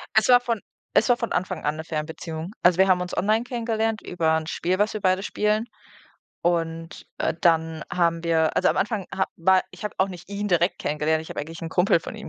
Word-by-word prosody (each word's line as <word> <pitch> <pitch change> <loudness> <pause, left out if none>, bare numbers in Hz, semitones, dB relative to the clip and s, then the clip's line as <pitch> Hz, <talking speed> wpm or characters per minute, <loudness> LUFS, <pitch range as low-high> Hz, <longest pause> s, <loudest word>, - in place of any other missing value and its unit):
Es 220 +1 +4
war 245 0 +8
von 235 -4 -2 0.3
es 230 - +4
war 245 - +5
von 235 - -3
Anfang 185 -2 -2
an 150 - +1
'ne 160 - -6
Fernbeziehung. 160 +2 -5
Also, 180 0 +4
wir 190 0 +5
haben 180 -1 +3
uns 180 0 -5
online 215 +4 +2
kennengelernt 225 -2 -1
über 160 -3 +1
'n 160 - -4
Spiel, 180 +3 -1
was 210 +2 +1
wir 215 - -4
beide 185 0 +2
spielen. 210 +2 0 0.8
Und, 165 -1 -2
äh, - - 0
dann 160 -2 +1
haben 170 -1 +1
wir 160 -1 +2
also, 185 - +4
am - - -1
Anfang 210 -2 -1
ha 190 - +1
war 185 +2 +4
ich - - -11
habe 210 - -3
auch 190 +1 +3
nicht 180 0 -10
ihn 205 +1 -3
direkt 175 0 +2
kennengelernt, 150 +1 0
ich 160 - -11
habe - - -4
eigentlich 160 +2 -8
'n 165 - -4
Kumpel 175 0 +3
von - - -8
ihm 220 - -8
180 Hz, 230 wpm, -24 LUFS, 165-210 Hz, 0.8 s, war